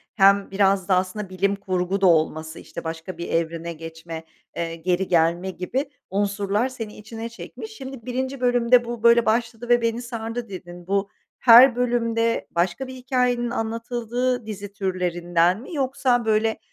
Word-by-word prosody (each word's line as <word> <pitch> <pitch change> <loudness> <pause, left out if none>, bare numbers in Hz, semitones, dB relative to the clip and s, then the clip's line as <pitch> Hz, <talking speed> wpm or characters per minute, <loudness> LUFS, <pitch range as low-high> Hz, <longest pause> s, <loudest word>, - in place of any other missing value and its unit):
hem 200 -1 +4
biraz 195 -1 +2
da 190 - +4
aslında 185 +2 -2
bilim 195 +2 0
kurgu 190 0 -2
da 190 - +5
olması, 160 -1 +1
işte, - - -9
başka 165 +2 -6
bir 170 - -5
evrene 165 0 -1
geçme, 165 0 -8 0.3
eee, 165 -1 -3
geri 180 +3 -1
gelme 170 +2 +2
gibi 250 - -3 0.2
unsurlar 205 +4 0
seni 225 -5 -7
içine 225 +2 -7
çekmiş. 230 -1 -9
Şimdi 265 0 -9
1'inci 260 +1 -3
bölümde 245 0 +4
"Bu, 235 -1 -6
böyle, 235 0 +6
başladı 230 +1 -1
ve 240 0 +5
beni 230 +1 0
sardı." 230 -1 -5
dedin. 175 -1 -9
Bu 200 0 0 0.3
her 245 +1 +8
bölümde 230 -2 0
başka 185 +10 -1
bir 260 - -8
hikâyenin 250 -1 0
anlatıldığı 240 +1 -2
dizi 205 -2 -7
türlerinden 180 0 0
mi 300 - -10
yoksa, 260 -3 +1
böyle, 220 0 +1
215 Hz, 155 wpm, -23 LUFS, 180-240 Hz, 0.3 s, her